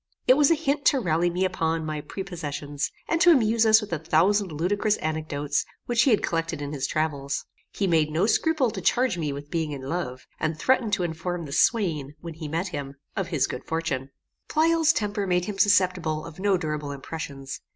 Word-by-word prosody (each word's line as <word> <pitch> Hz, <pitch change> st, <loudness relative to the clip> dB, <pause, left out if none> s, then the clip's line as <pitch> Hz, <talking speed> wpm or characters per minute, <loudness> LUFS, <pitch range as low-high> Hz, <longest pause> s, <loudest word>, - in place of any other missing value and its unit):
It -, -, +7 dB
was 290 Hz, 0 st, +4 dB
a 330 Hz, -, +5 dB
hint 290 Hz, -2 st, -1 dB
to 275 Hz, -, +5 dB
rally 175 Hz, -4 st, +1 dB
me 180 Hz, +2 st, 0 dB
upon 165 Hz, -3 st, -1 dB
my 155 Hz, -1 st, -3 dB
prepossessions, 145 Hz, -5 st, -4 dB, 0.2 s
and 330 Hz, -, 0 dB
to 350 Hz, -, +7 dB
amuse 230 Hz, -7 st, +4 dB
us 220 Hz, 0 st, +7 dB
with 205 Hz, -5 st, -6 dB
a 160 Hz, -, -1 dB
thousand 185 Hz, +5 st, +2 dB
ludicrous 200 Hz, +7 st, 0 dB
anecdotes 150 Hz, -2 st, -2 dB, 0.2 s
which 240 Hz, -1 st, +2 dB
he 265 Hz, -, +4 dB
had 220 Hz, -, +3 dB
collected 165 Hz, -2 st, -1 dB
in 145 Hz, 0 st, -5 dB
his 135 Hz, -2 st, -2 dB
travels. 145 Hz, -3 st, -2 dB, 0.2 s
He 200 Hz, -, -2 dB
made 160 Hz, -4 st, +3 dB
no 160 Hz, +5 st, +1 dB
scruple 275 Hz, +1 st, +2 dB
to 190 Hz, -, -6 dB
charge 240 Hz, +1 st, +2 dB
me 150 Hz, -3 st, -1 dB
with 145 Hz, +1 st, -8 dB
being 160 Hz, -3 st, -1 dB
in 135 Hz, -2 st, -7 dB
love; 130 Hz, -3 st, -4 dB
and 155 Hz, 0 st, -1 dB
threatened 240 Hz, +2 st, +2 dB
to 180 Hz, -, +1 dB
inform 170 Hz, +1 st, -3 dB
the 140 Hz, -, -9 dB
swain, 155 Hz, -, +1 dB
when 170 Hz, -1 st, -7 dB
he 155 Hz, 0 st, -7 dB
met 165 Hz, +5 st, -2 dB
him, 140 Hz, -4 st, -6 dB, 0.2 s
of 195 Hz, -4 st, -2 dB
his 150 Hz, -6 st, +1 dB
good 125 Hz, -, -6 dB
fortune. 155 Hz, -5 st, -2 dB, 0.4 s
Pleyel's 325 Hz, 0 st, +4 dB
temper 205 Hz, -6 st, -2 dB
made 180 Hz, -1 st, +1 dB
him 200 Hz, -1 st, -5 dB
susceptible 180 Hz, -6 st, +2 dB
of 165 Hz, +1 st, -11 dB
no 195 Hz, -1 st, +2 dB
durable 150 Hz, -3 st, -3 dB
impressions. 140 Hz, -1 st, -7 dB
165 Hz, 205 wpm, -25 LUFS, 150-205 Hz, 0.4 s, It